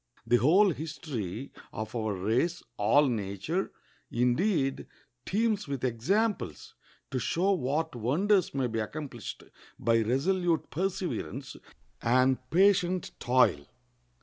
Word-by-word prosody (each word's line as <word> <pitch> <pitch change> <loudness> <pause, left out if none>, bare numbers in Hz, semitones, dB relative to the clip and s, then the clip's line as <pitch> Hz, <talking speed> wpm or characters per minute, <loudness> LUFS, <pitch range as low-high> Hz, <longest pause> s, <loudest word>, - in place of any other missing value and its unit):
The 120 - +4
whole 180 - +5
history 140 - -5 0.2
of 110 +2 -6
our 110 -3 -1
race, 120 - 0
all 145 +8 +4
nature, 110 - -2 0.4
indeed, 135 - +1 0.4
teems 215 -1 +1
with 140 -3 -4
examples 145 - -1 0.4
to 130 - -1
show 175 - +1
what 160 -2 -1
wonders 180 - +2
may 135 -2 +1
be 115 -2 -2
accomplished 120 -1 -6 0.3
by 115 0 +2
resolute 165 - +1
perseverance 175 -6 -3 0.5
and 130 +2 +3
patient 185 -1 +3
toil. 120 - +3
140 Hz, 105 wpm, -29 LUFS, 120-180 Hz, 0.5 s, whole